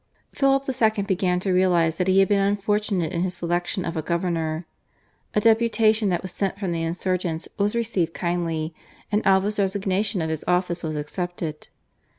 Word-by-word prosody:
Philip 275 0 +3
II. 220 -5 +1
began 185 -2 +1
to 190 - 0
realise 175 -3 +3
that 180 - 0
he 190 +1 +5
had 195 - +4
been 205 -1 +3
unfortunate 200 -3 0
in 170 - -1
his 185 0 -1
selection 175 +2 -2
of 170 - -3
a 160 - -1
governor. 170 -1 -1 0.7
A - - +5
deputation 220 -1 +3
that 175 0 -1
was 185 - -5
sent 195 0 -2
from 190 -4 -2
the 165 -1 -1
insurgents 170 0 -2
was 205 +2 +1
received 200 -8 -1
kindly, 170 -2 -2 0.4
and 210 +1 +1
Alva's 195 +2 +3
resignation 195 +1 0
of 160 -1 -1
his 160 - -3
office 180 -1 +1
was 155 -2 -3
accepted. 160 +1 -4
185 Hz, 170 wpm, -24 LUFS, 170-205 Hz, 0.7 s, he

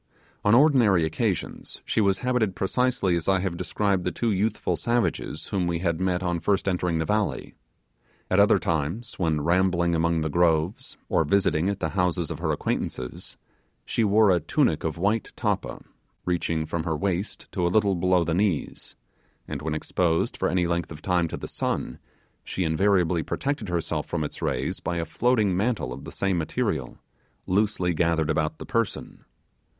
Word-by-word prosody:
On 105 +2 +5
ordinary 120 - +5
occasions 80 - -3
she - - +1
was 100 -2 +3
habited 120 -7 +1
precisely 100 -3 +1
as 85 -1 -2
I 95 -1 +3
have 95 -3 -2
described 95 +1 0
the 90 - -1
two 115 +6 -1
youthful 100 -2 0
savages 120 +8 -1
whom 90 -3 0
we 85 -1 0
had 85 -1 -1
met 95 -1 0
on 85 -1 0
first 95 +4 0
entering 90 -3 0
the 80 - 0
valley. 105 +2 -1 0.7
At - - +2
other - - +6
times, 85 - -2
when 80 -4 +1
rambling 85 +1 +2
among 85 0 +1
the 80 - -1
groves, 85 +3 +1
or - - +2
visiting 95 -3 +2
at 100 -1 -2
the 80 - 0
houses 90 -3 0
of - - -5
her - - 0
acquaintances, 65 -1 -3 0.5
she 115 - 0
wore 105 0 +5
a 90 - +3
tunic 85 - +1
of 80 -1 -2
white 105 +5 0
tappa, - - -2 0.4
reaching 85 -2 0
from 80 +1 -2
her 80 -1 -2
waist 95 +3 -2
to 90 - -2
a - - +2
little 100 +1 +3
below 90 0 +2
the 85 0 -1
knees; 90 -4 -1 0.5
and 75 -2 -5
when 75 0 -2
exposed 80 +1 0
for - - 0
any 90 -1 +1
length 85 -1 -1
of 80 0 -9
time 90 -2 +1
to - - -5
the - - -6
sun, 60 - -3 0.4
she 95 - -3
invariably 90 0 +2
protected 135 - -3
herself 85 -3 -2
from 85 -2 -2
its 75 - -6
rays - - -1
by 85 - -3
a 85 - -1
floating 105 +3 +1
mantle 100 - -1
of - - -9
the - - -7
same 95 -3 0
material, 80 - -2 0.5
loosely 95 -2 +1
gathered 80 -1 +1
about 75 0 -1
the - - -8
person. 115 -4 -3
90 Hz, 175 wpm, -25 LUFS, 80-100 Hz, 0.7 s, other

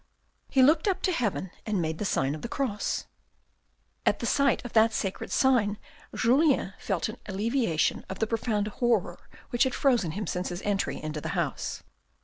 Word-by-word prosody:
He 265 -2 +4
looked 310 +7 +4
up 380 -1 0
to 375 - +2
heaven 210 - -1
and 210 -3 -1
made 160 -1 -2
the 210 - -2
sign 135 -7 +1
of 155 - -6
the - - -4
cross. 240 -7 -2 1.0
At - - +2
the - - -4
sight 275 -3 +2
of 245 - -7
that 220 0 +5
sacred 195 -3 -3
sign 230 -6 +3 0.4
Julien 260 -4 +3
felt 190 -5 -1
an 220 +2 -7
alleviation 210 - 0
of 190 - -5
the 220 - +1
profound 215 -2 -1
horror 215 -7 -1 0.2
which 240 - -2
had 260 -2 0
frozen 240 - +2
him 210 +3 -3
since 180 0 -2
his 175 +1 -6
entry 200 -1 -1
into 155 -1 -5
the - - -4
house. - - -2
215 Hz, 180 wpm, -28 LUFS, 190-255 Hz, 1.0 s, that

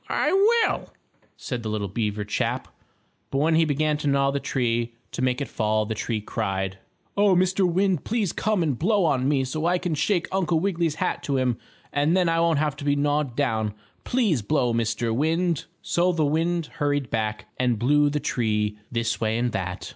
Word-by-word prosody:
"I - - +1
will," 440 +4 +3 0.5
said 125 -3 -4
the 110 - -4
little 105 -1 -2
beaver 105 +1 -2
chap. 105 - -2 0.6
But 135 - -2
when 155 +4 +3
he 160 0 +4
began 150 0 +1
to 150 - -3
gnaw 140 0 +3
the 140 - -1
tree, 120 -3 -1 0.2
to - - -4
make 125 +1 +1
it 140 - -2
fall, 110 0 0
the 110 - -3
tree 110 +1 -2
cried: 95 -3 -3 0.4
"Oh, 200 -2 +4
Mr. 185 0 +2
Wind, 185 -2 +1
please 215 -6 -1
come 210 -4 0
and 140 -7 -1
blow 200 +1 +2
on 135 -4 +2
me 140 -2 +2
so 155 +5 -2
I 180 +1 +3
can 180 -2 -2
shake 170 +3 +1
Uncle 180 -4 +1
Wiggily's 170 -4 0
hat 180 +2 -1
to 140 -2 0
him, 125 -3 0 0.3
and 150 +5 +2
then 180 -2 +3
I 165 0 +2
won't 165 -2 +3
have 150 -1 0
to 145 - -7
be 145 0 +2
gnawed 145 -3 0
down. 110 -7 0 0.3
Please 215 - +1
blow, 125 +1 +1
Mr. 115 0 0
Wind." 165 +3 +1 0.2
So 175 +1 +2
the 160 -3 +1
wind 165 +3 0 0.2
hurried 145 -3 0
back 110 -1 -2
and 125 -2 +2
blew 145 +6 +3
the 150 +1 -1
tree 105 -5 -1
this 115 -1 -1
way 110 0 +1
and 120 0 0
that. 90 -3 -4
145 Hz, 200 wpm, -25 LUFS, 115-170 Hz, 0.6 s, he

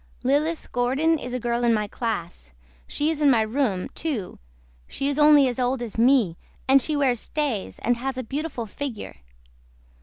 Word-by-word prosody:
LILITH 300 +5 0
GORDON 275 +7 +1
IS 250 -2 -5
A - - -2
GIRL 240 0 -1
IN 235 -1 +4
MY 210 -1 -1
CLASS 175 - -5 0.3
SHE 300 +2 0
IS 310 -2 -4
IN 290 - +5
MY 235 -4 +4
ROOM 220 -5 -1
TO 260 - -4 0.5
SHE 275 - -2
IS 285 +1 -2
ONLY 295 -2 +6
AS 250 0 -3
OLD 250 0 0
AS 225 -1 -6
ME 235 -9 +3 0.3
AND 270 +1 +6
SHE 305 +4 -1
WEARS 260 -5 +2
STAYS 280 -10 -3
AND 240 +1 0
HAS 260 +1 -4
A 255 - -3
BEAUTIFUL 275 -1 -4
FIGGURE. 235 - -6
255 Hz, 180 wpm, -24 LUFS, 230-285 Hz, 0.5 s, ONLY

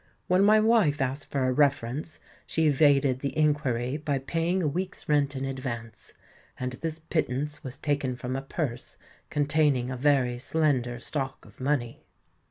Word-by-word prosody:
When 185 +2 +3
my 215 +1 +6
wife 215 -10 +3
asked 135 +1 -2
for 140 -2 0
a 130 - +2
reference 140 +1 0 0.3
she 160 - +1
evaded 140 -3 +4
the 140 +3 -4
inquiry 145 -4 +1
by 145 -2 -1
paying 165 +7 -1
a - - +2
week's 185 +6 -3
rent 145 -2 +2
in 135 0 -3
advance; 130 -4 -6 0.5
and 125 0 -2
this 160 +4 -4
pittance 150 -3 -2
was 130 0 -7
taken 140 -3 -1
from 125 +1 -4
a 135 - -2
purse 135 -3 -4 0.3
containing 145 -4 +2
a - - -3
very 125 -2 +2
slender 130 -4 0
stock 135 +1 -4
of - - -18
money. 130 -3 -1
140 Hz, 160 wpm, -27 LUFS, 130-155 Hz, 0.5 s, my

